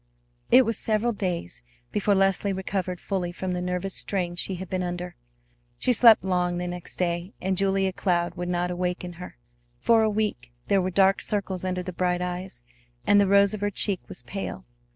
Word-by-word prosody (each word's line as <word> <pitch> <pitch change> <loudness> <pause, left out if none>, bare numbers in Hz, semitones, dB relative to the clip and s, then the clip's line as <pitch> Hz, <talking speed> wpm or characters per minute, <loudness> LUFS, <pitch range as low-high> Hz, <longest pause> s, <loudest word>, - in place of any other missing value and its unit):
It 255 +1 +7
was 225 -2 -1
several 225 +2 +1
days 180 - -3 0.3
before 205 0 +2
Leslie 195 +1 +2
recovered 190 -1 -3
fully 185 -3 -2
from 185 +1 -4
the 180 - -2
nervous 180 +1 -2
strain 180 -3 0
she 185 +2 -3
had 185 +1 -6
been 185 +1 -2
under. 180 0 -4 0.6
She 250 - +2
slept 230 -2 +7
long 180 -1 0
the 180 - -3
next 175 0 -6
day, 175 +2 -2
and 190 +1 -1
Julia 195 0 +1
Cloud 175 -2 0
would 175 0 -4
not 180 0 -1
waken 180 0 -3
her. 180 - -9 0.4
For 225 - +4
a 220 - +3
week 205 - -2 0.2
there 200 -2 +4
were 185 - -1
dark 195 +1 +3
circles 195 -3 -2
under 185 -1 -2
the 185 0 -6
bright 180 0 0
eyes, 180 - -5 0.4
and 205 - +5
the 200 - +3
rose 200 +1 +5
of 210 - -5
her 205 - +1
cheek 200 -1 -1
was - - -7
pale. 195 -1 -5
185 Hz, 195 wpm, -26 LUFS, 180-200 Hz, 0.6 s, It